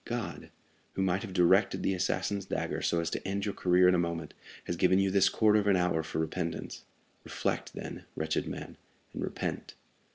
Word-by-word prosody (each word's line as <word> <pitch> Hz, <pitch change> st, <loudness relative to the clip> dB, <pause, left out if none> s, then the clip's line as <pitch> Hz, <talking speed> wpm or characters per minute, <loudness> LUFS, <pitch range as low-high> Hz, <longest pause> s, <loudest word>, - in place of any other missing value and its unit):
God, 120 Hz, -2 st, -4 dB, 0.4 s
who 95 Hz, -, -1 dB
might 95 Hz, +1 st, +1 dB
have 110 Hz, -, -6 dB
directed 90 Hz, -2 st, +3 dB
the 95 Hz, -, +2 dB
assassin's 95 Hz, +2 st, -1 dB
dagger -, -, -2 dB
so 85 Hz, -, +1 dB
as 85 Hz, -, -3 dB
to -, -, -2 dB
end 100 Hz, +1 st, -1 dB
your 100 Hz, -, -2 dB
career 90 Hz, 0 st, +4 dB
in 90 Hz, -, +5 dB
a 90 Hz, -, +3 dB
moment, 85 Hz, -2 st, -3 dB, 0.3 s
has -, -, -3 dB
given 95 Hz, -, +3 dB
you 95 Hz, 0 st, +2 dB
this 95 Hz, 0 st, +4 dB
quarter 110 Hz, -1 st, +4 dB
of 105 Hz, -, -1 dB
an 100 Hz, -, +5 dB
hour 90 Hz, -3 st, +1 dB
for 80 Hz, 0 st, -6 dB
repentance. 80 Hz, +1 st, -3 dB, 0.4 s
Reflect, -, -, -3 dB
then, -, -, -7 dB
wretched 80 Hz, 0 st, -1 dB
man, -, -, -7 dB, 0.4 s
and -, -, -5 dB
repent." -, -, -4 dB
90 Hz, 195 wpm, -30 LUFS, 85-100 Hz, 0.4 s, in